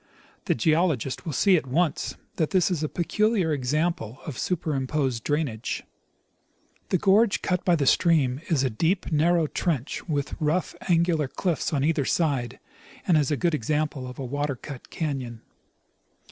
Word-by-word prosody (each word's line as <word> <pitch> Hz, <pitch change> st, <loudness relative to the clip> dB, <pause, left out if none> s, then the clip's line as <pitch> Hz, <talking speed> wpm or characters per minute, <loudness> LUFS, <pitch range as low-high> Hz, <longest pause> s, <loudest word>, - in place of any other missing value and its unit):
The -, -, +2 dB
geologist 155 Hz, 0 st, +1 dB
will -, -, -1 dB
see 185 Hz, +6 st, +4 dB
at 145 Hz, -, -3 dB
once 160 Hz, +5 st, 0 dB, 0.2 s
that 160 Hz, -, +1 dB
this 185 Hz, -1 st, +2 dB
is 170 Hz, -4 st, -1 dB
a 155 Hz, -, -1 dB
peculiar 195 Hz, -1 st, +1 dB
example 140 Hz, -3 st, -1 dB
of 150 Hz, -, -5 dB
superimposed 135 Hz, -7 st, -1 dB
drainage. 145 Hz, -7 st, -2 dB, 1.1 s
The 185 Hz, -, +3 dB
gorge 200 Hz, +4 st, +3 dB
cut 180 Hz, -1 st, 0 dB
by 175 Hz, -, +4 dB
the 145 Hz, -4 st, 0 dB
stream 145 Hz, -4 st, +3 dB
is 150 Hz, -6 st, +2 dB
a 130 Hz, -, 0 dB
deep 170 Hz, -, 0 dB
narrow 165 Hz, +2 st, +3 dB
trench 155 Hz, 0 st, -2 dB
with 145 Hz, -2 st, -1 dB
rough 155 Hz, +4 st, 0 dB, 0.2 s
angular 165 Hz, -3 st, +2 dB
cliffs 170 Hz, +4 st, -2 dB
on 140 Hz, -3 st, 0 dB
either 155 Hz, -2 st, +1 dB
side, 135 Hz, -7 st, 0 dB, 0.5 s
and 175 Hz, -, +4 dB
is 150 Hz, -3 st, +3 dB
a 150 Hz, -, 0 dB
good 175 Hz, +1 st, +1 dB
example 150 Hz, 0 st, -1 dB
of 125 Hz, -, -9 dB
a 135 Hz, -, -4 dB
water 145 Hz, +2 st, -2 dB
cut 130 Hz, +1 st, -10 dB
canon. 130 Hz, -8 st, -4 dB
155 Hz, 160 wpm, -26 LUFS, 135-170 Hz, 1.1 s, see